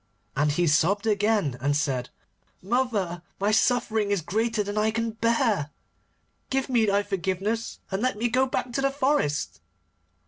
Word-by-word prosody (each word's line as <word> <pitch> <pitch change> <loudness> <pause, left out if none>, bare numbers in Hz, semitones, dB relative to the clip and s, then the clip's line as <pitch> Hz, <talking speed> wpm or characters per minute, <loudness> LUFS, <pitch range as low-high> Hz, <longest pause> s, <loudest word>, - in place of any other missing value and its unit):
And 145 +1 +2
he 175 +3 +1
sobbed 170 +7 +2
again 205 - +1
and 145 +1 +1
said: 135 -5 -1 0.5
'Mother, 200 -6 0 0.2
my 200 +2 +2
suffering 225 -2 +2
is 200 -3 +1
greater 220 +4 0
than 205 +1 -5
I 215 +1 +2
can 230 +1 -1
bear. 225 - +1 0.8
Give 270 0 -1
me 235 -4 +3
thy 200 0 +2
forgiveness, 200 +3 -2
and 190 +2 -1
let 255 -2 0
me 235 +3 +1
go 255 +3 +2
back 250 -1 -3
to 275 - 0
the 275 - +2
forest. 150 - 0
210 Hz, 160 wpm, -26 LUFS, 175-230 Hz, 0.8 s, me